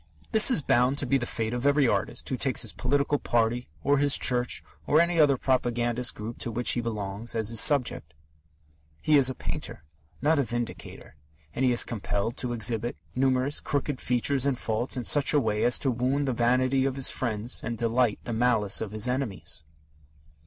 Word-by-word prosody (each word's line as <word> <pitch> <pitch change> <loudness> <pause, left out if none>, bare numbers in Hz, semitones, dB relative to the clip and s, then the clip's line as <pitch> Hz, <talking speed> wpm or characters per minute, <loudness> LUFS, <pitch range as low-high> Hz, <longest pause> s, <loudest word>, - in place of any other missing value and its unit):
This 220 +3 +7
is 210 - +2
bound 125 +3 +2
to 145 - -1
be 135 +2 +1
the 120 - -4
fate 110 0 -3
of 125 +3 -1
every 145 -2 +3
artist 115 +3 -2
who 130 - -2
takes 130 +1 +1
his - - -2
political 140 +2 0
party 120 +1 0 0.2
or 140 0 +2
his 145 -1 +4
church, 125 -1 0 0.2
or 150 - +4
any 170 0 +2
other 145 -3 +4
propagandist 120 -1 0
group 110 +3 -7
to - - -3
which 120 +2 0
he 120 - 0
belongs, 110 0 -5
as 110 -2 -1
his 115 -1 0
subject. 125 - +2 0.8
He 155 - +2
is 135 -3 +5
a 130 - -5
painter, - - -6 0.4
not 155 +2 +2
a - - +2
vindicator, 120 - -6 0.4
and 130 - -2
he 130 - +3
is 120 - +5
compelled 105 0 -3
to 125 - -3
exhibit 115 -2 -1 0.2
numerous 130 +2 +1
crooked 145 -1 -3
features 130 +2 0
and 135 -3 0
faults 120 +3 -2
in 125 - -3
such 145 +1 +3
a - - +5
way 110 -4 -1
as 125 - +4
to 135 - 0
wound 130 +4 -1
the 130 - 0
vanity 130 +3 +1
of 135 -1 -1
his 135 -1 0
friends 115 -1 -3
and 115 0 -4
delight 115 0 +1
the 120 - -5
malice 110 -4 +1
of 110 - -3
his 110 +2 -1
enemies. 125 - -4
125 Hz, 195 wpm, -26 LUFS, 115-135 Hz, 0.8 s, This